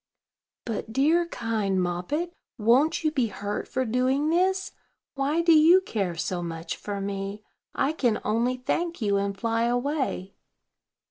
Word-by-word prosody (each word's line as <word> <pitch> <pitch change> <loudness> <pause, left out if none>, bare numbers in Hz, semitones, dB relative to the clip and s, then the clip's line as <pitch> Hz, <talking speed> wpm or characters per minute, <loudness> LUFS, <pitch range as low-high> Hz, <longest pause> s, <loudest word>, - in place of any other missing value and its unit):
"But, 225 -1 -4
dear, 315 +8 +3
kind 220 - -1
Moppet, 180 - -2 0.2
won't 245 +10 +3
you 310 - +2
be 260 -6 +1
hurt 205 -1 -4
for 260 0 -1
doing 260 +6 +1
this? 375 +2 +1 0.4
Why 290 +4 0
do 335 -1 +6
you 320 +4 +7
care 200 - -2
so 175 +2 -2
much 165 -1 -5
for 205 -1 -5
me? 195 +1 -4 0.3
I 270 - +1
can 245 -8 +1
only 235 +4 +1
thank 335 +7 -2
you, 205 -4 +1
and 200 0 -2
fly 230 +2 0
away." 245 -5 -1
240 Hz, 145 wpm, -26 LUFS, 200-300 Hz, 0.4 s, you